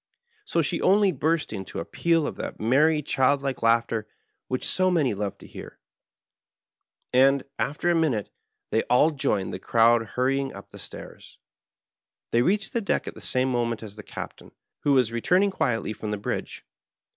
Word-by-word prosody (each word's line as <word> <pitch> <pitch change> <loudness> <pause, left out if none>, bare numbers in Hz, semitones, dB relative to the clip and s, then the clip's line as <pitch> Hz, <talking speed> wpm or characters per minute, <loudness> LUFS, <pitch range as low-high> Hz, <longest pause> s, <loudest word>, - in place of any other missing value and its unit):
So 170 - +1
she 165 +3 -1
only 200 0 +4
burst 160 -2 -1
into 95 -2 -6
a - - -3
peal 165 -2 +1
of - - -4
that - - -6
merry 150 +7 +3
child 135 +1 +2
like 135 -2 -3
laughter 115 -1 +1 0.4
which 130 - -2
so 185 0 +3
many 155 -10 +2
love 100 -1 -4
to - - -14
hear, - - -11 1.4
and, 135 +1 +5 0.2
after 150 +5 -1
a 175 - +4
minute, 150 -11 0 0.4
they 110 - +2
all 135 +6 +4
joined 105 -9 -1
the 90 - -5
crowd 115 +3 +4
hurrying 135 +1 0
up 100 - -12
the - - -12
stairs. - - -10 0.9
They 120 - +3
reached 195 - 0
the 235 - 0
deck 200 - -1
at - - -5
the - - -12
same 130 +1 0
moment 120 -2 -1
as 105 -2 -9
the 105 - -9
Captain, - - -9 0.3
who 145 - +2
was 125 -4 +3
returning 180 - +2
quietly 115 - -1
from 110 - -6
the 105 - -2
bridge. 100 - -5
130 Hz, 175 wpm, -25 LUFS, 115-160 Hz, 1.4 s, and